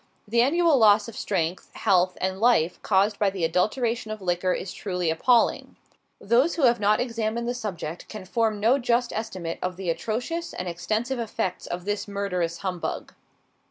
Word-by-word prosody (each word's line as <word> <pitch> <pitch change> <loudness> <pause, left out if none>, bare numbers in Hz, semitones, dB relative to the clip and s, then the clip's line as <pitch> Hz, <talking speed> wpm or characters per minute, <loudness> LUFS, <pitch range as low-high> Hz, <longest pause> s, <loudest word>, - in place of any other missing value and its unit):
The 235 +3 +3
annual 315 +2 +3
loss 210 -1 +5
of 230 - -9
strength, 175 -3 -2
health, 185 -1 +2
and 190 +1 -2
life 210 -7 +3
caused 200 +1 +2
by 205 - +3
the 190 -3 -5
adulteration 220 +7 0
of 215 0 -5
liquor 180 -1 0
is 180 +1 -3
truly 180 -4 -2
appalling. 235 +9 +2 0.4
Those 245 +10 +2
who 325 - -1
have 240 -2 +5
not 210 +1 +3
examined 230 -1 -2
the 245 - 0
subject 180 -8 -6
can 210 -3 -8
form 220 +1 0
no 235 +6 +3
just 240 -1 +1
estimate 185 -7 -4
of 180 -1 -3
the 185 -3 -1
atrocious 245 - -3
and 180 - -4
extensive 220 +9 -2
effects 220 -5 -3
of 175 +1 -5
this 205 +1 -2
murderous 180 -4 -2
humbug. 180 -2 -4
210 Hz, 170 wpm, -25 LUFS, 180-235 Hz, 0.4 s, loss